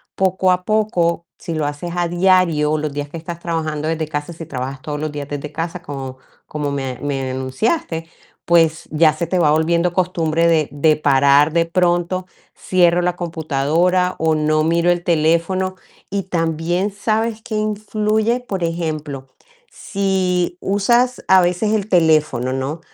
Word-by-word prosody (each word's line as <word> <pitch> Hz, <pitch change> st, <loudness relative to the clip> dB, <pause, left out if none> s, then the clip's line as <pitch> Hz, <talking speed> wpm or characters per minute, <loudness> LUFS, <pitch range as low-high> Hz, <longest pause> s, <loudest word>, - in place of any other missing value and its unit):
poco 190 Hz, 0 st, +2 dB
a 180 Hz, +1 st, 0 dB
poco, 175 Hz, -6 st, +1 dB
si 165 Hz, -, -5 dB
lo 155 Hz, -2 st, -1 dB
haces 145 Hz, +4 st, -4 dB
a 175 Hz, -1 st, 0 dB
diario, 175 Hz, -4 st, +2 dB
los 150 Hz, -2 st, -3 dB
días 145 Hz, 0 st, -4 dB
que 165 Hz, -, -7 dB
estás 170 Hz, +1 st, -7 dB
trabajando 155 Hz, -3 st, -3 dB
desde 160 Hz, -1 st, -1 dB
casa, 150 Hz, +2 st, -4 dB
si 165 Hz, 0 st, -8 dB
trabajas 135 Hz, -2 st, -5 dB
todos 150 Hz, -1 st, -4 dB
los 155 Hz, 0 st, -3 dB
días 145 Hz, -1 st, -6 dB
desde 145 Hz, 0 st, -5 dB
casa, 170 Hz, +3 st, -4 dB
como 135 Hz, -5 st, -7 dB, 0.3 s
como 150 Hz, -2 st, -3 dB
me 135 Hz, -3 st, -4 dB
me 135 Hz, -2 st, -2 dB
enunciaste, 160 Hz, -, -2 dB, 0.4 s
pues, 165 Hz, -2 st, +3 dB
ya 155 Hz, 0 st, +4 dB
se 155 Hz, +3 st, -3 dB
te 180 Hz, +2 st, 0 dB
va 150 Hz, -3 st, +4 dB
volviendo 170 Hz, +3 st, +2 dB
costumbre 170 Hz, -3 st, +1 dB
de 160 Hz, -3 st, +2 dB
de 150 Hz, +2 st, +3 dB
parar 140 Hz, +1 st, +4 dB
de 165 Hz, -1 st, +3 dB
pronto, 175 Hz, +1 st, 0 dB, 0.3 s
cierro 175 Hz, -1 st, +2 dB
la 175 Hz, 0 st, 0 dB
computadora, 170 Hz, +3 st, 0 dB
o 160 Hz, -1 st, +2 dB
no 155 Hz, 0 st, +1 dB
miro 170 Hz, +2 st, +2 dB
el 175 Hz, 0 st, -1 dB
teléfono. 170 Hz, +3 st, +1 dB, 0.4 s
Y 200 Hz, -1 st, -1 dB
también, 170 Hz, +2 st, -1 dB
¿sabes 220 Hz, +2 st, -1 dB
qué 230 Hz, -3 st, -5 dB
influye? 215 Hz, +2 st, 0 dB
Por 195 Hz, -7 st, -4 dB
ejemplo, 155 Hz, -5 st, -3 dB, 0.4 s
si 185 Hz, -3 st, -1 dB
usas 240 Hz, +6 st, +1 dB
a 190 Hz, 0 st, +6 dB
veces 180 Hz, +5 st, +1 dB
el 215 Hz, -1 st, -1 dB
teléfono, 155 Hz, -7 st, +2 dB
¿no? 135 Hz, +5 st, -3 dB
170 Hz, 160 wpm, -19 LUFS, 150-185 Hz, 0.4 s, a